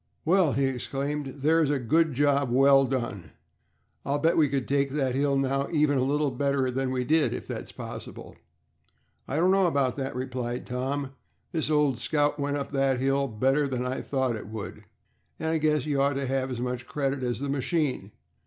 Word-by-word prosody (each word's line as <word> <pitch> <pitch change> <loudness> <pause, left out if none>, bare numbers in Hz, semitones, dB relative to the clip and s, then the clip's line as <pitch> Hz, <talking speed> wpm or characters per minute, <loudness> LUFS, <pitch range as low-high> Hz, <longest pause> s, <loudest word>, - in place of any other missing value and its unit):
"Well!" 175 -3 +3
he 135 - +1
exclaimed. 135 +2 -3
"There's 160 0 +3
a 145 - +2
good 150 +4 +1
job 140 -1 +2
well 135 +2 +5
done. 120 - -4 0.7
I'll 140 +2 0
bet 160 +3 +2
we 150 -3 +4
could 135 -1 -2
take 140 0 +1
that 135 -2 -1
hill 140 +1 +1
now 135 +1 0
even 150 -4 +2
a - - +2
little 145 +1 +1
better 135 0 0
than 135 +1 -1
we 130 -1 -1
did, 155 +4 +2
if - - -7
that's - - -6
possible." - - -9 0.9
"I 135 - -3
don't 175 +4 +3
know 195 -1 +4
about 140 -5 0
that," 135 -2 -3
replied 125 -1 -4
Tom, 135 +2 -3 0.4
"this 160 -4 -1
old 150 -5 +2
Scout 145 -1 0
went 145 0 -1
up 140 - -5
that 135 -2 +1
hill 135 +1 +1
better 135 +5 +1
than 125 -2 -2
I 130 +1 -2
thought 130 -4 -1
it 105 -1 -8
could, 110 -2 -7 0.5
and 160 - -1
I 160 0 +1
guess 150 -3 +1
you 145 -2 0
ought 140 +1 +2
to 140 0 -2
have 135 0 -1
as 125 -2 -4
much 125 0 -3
credit 140 -2 -2
as 120 -1 -2
the 140 - -3
machine. 135 - -1
135 Hz, 195 wpm, -27 LUFS, 130-145 Hz, 0.9 s, well